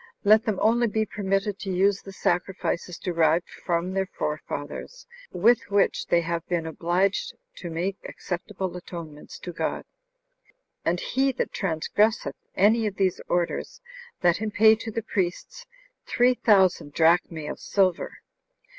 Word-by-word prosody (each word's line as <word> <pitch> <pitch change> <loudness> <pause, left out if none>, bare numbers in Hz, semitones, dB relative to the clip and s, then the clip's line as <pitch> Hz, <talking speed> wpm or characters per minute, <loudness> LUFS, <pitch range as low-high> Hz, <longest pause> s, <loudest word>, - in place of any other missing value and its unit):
Let 215 +3 +5
them 215 -5 0
only 235 +2 +4
be 220 0 0
permitted 195 0 -1
to 195 - -5
use 195 +2 +2
the 195 - -10
sacrifices 180 -1 -2
derived 170 -1 +1
from 175 +1 -2
their 190 0 0
forefathers, 150 - -5 0.3
with 230 +6 +3
which 200 0 +1
they 170 - +3
have 170 0 -2
been 170 -2 -1
obliged 185 - 0 0.2
to 175 - -6
make 180 +4 -2
acceptable 185 0 -5
atonements 165 -4 -9
to 180 - -7
God. - - -3 1.0
And 175 +1 0
he 270 +6 +1
that 255 - -2
transgresseth 200 +5 0 0.2
any 220 +3 +4
of 200 - -4
these 190 -3 0
orders, 175 - -1 0.4
let 175 -1 +4
him 220 +1 -2
pay 220 +1 +6
to 225 +1 -4
the 225 +1 -3
priests 195 - -3 0.4
three 245 +1 +3
thousand 190 -10 +3
drachmae 165 -1 +2
of - - -5
silver." 185 -3 0
190 Hz, 140 wpm, -25 LUFS, 170-215 Hz, 1.0 s, pay